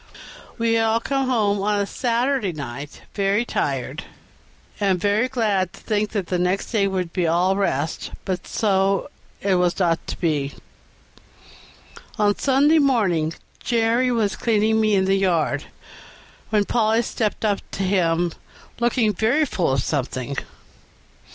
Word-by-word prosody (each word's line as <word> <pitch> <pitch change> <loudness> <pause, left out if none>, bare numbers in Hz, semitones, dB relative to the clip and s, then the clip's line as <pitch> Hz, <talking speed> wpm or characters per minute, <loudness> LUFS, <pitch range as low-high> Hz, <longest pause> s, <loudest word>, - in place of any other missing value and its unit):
We 230 -1 +1
had 225 0 +3
all 225 +1 +2
come 270 +2 -1
home 205 -5 +1
on 205 +1 +1
the 200 - +1
Saturday 240 -2 0
night 140 -1 -7
very 200 +3 +1
tired, - - -2 0.7
and 195 -3 +2
very 205 +6 +2
glad 205 -8 0
to - - -13
think 210 -1 -1
that 200 -4 -1
the 180 +1 -1
next 180 +2 0
day 205 -4 +2
would 185 -3 -2
be 175 -2 0
all 180 +4 +2
rest, 160 -6 -1 0.2
but 185 -2 -3
so 195 -2 +1 0.3
it 195 -1 +1
was 180 -1 +1
not 170 -3 0
to - - -4
be. 145 -5 -1 1.6
On 205 -2 +3
Sunday 285 +4 +3
morning 190 - +2 0.2
Jerry 235 +1 +1
was 220 -4 0
cleaning 220 -1 +2
me 215 -1 +3
in 190 -1 +2
the 190 - +2
yard, 165 -6 +1 0.8
when 210 -2 +2
Polly 225 +1 +2
stepped 220 -1 -2
up 205 -2 +1
to 195 - -3
him, 175 -3 +1 0.5
looking 235 -2 +2
very 235 - +2
full 180 - 0
of 130 - 0
something. 135 -1 -2
200 Hz, 145 wpm, -22 LUFS, 180-225 Hz, 1.6 s, had